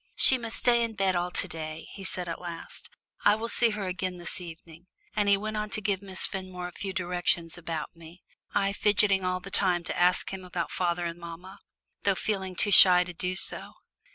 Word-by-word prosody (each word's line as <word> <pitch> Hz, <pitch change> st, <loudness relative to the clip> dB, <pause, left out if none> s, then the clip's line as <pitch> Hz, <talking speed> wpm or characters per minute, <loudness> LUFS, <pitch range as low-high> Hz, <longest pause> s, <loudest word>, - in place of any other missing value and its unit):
"She 260 Hz, -, +5 dB
must 225 Hz, -2 st, -5 dB
stay 240 Hz, -1 st, +3 dB
in 230 Hz, -1 st, -4 dB
bed 190 Hz, -2 st, +1 dB
all 175 Hz, 0 st, 0 dB
to -, -, +1 dB
day," 155 Hz, 0 st, -7 dB
he 195 Hz, -, -9 dB
said 180 Hz, -1 st, -3 dB
at 165 Hz, -, -5 dB
last. 170 Hz, -2 st, -8 dB, 0.3 s
"I 205 Hz, -, +5 dB
will 225 Hz, +2 st, -4 dB
see 235 Hz, 0 st, +3 dB
her 210 Hz, -2 st, -4 dB
again 185 Hz, 0 st, -3 dB
this 175 Hz, +2 st, -6 dB
evening," 165 Hz, 0 st, -12 dB, 0.3 s
and 205 Hz, -1 st, +2 dB
he 200 Hz, -, +5 dB
went 215 Hz, +1 st, -4 dB
on 210 Hz, 0 st, -3 dB
to 215 Hz, -, -1 dB
give 200 Hz, -2 st, -1 dB
Miss 190 Hz, -2 st, -3 dB
Fenmore 185 Hz, -2 st, -5 dB
a -, -, -9 dB
few 195 Hz, +2 st, -5 dB
directions 175 Hz, -2 st, +1 dB
about 165 Hz, -2 st, -5 dB
me, 165 Hz, +2 st, -15 dB, 0.3 s
I 200 Hz, -1 st, +1 dB
fidgeting 200 Hz, -2 st, +3 dB
all 185 Hz, 0 st, -1 dB
the 195 Hz, -, -10 dB
time 180 Hz, -3 st, +2 dB
to 175 Hz, -, -3 dB
ask 180 Hz, +2 st, +2 dB
him 190 Hz, -1 st, -6 dB
about 180 Hz, -2 st, -4 dB
father 175 Hz, -1 st, -1 dB
and 170 Hz, 0 st, -5 dB
mamma, 175 Hz, +4 st, -10 dB, 0.4 s
though 200 Hz, -1 st, +2 dB
feeling 190 Hz, -2 st, -3 dB
too 205 Hz, -, +1 dB
shy 180 Hz, -2 st, +9 dB
to 180 Hz, 0 st, -8 dB
do 180 Hz, +2 st, -3 dB
so. -, -, -3 dB
185 Hz, 215 wpm, -28 LUFS, 175-200 Hz, 0.4 s, shy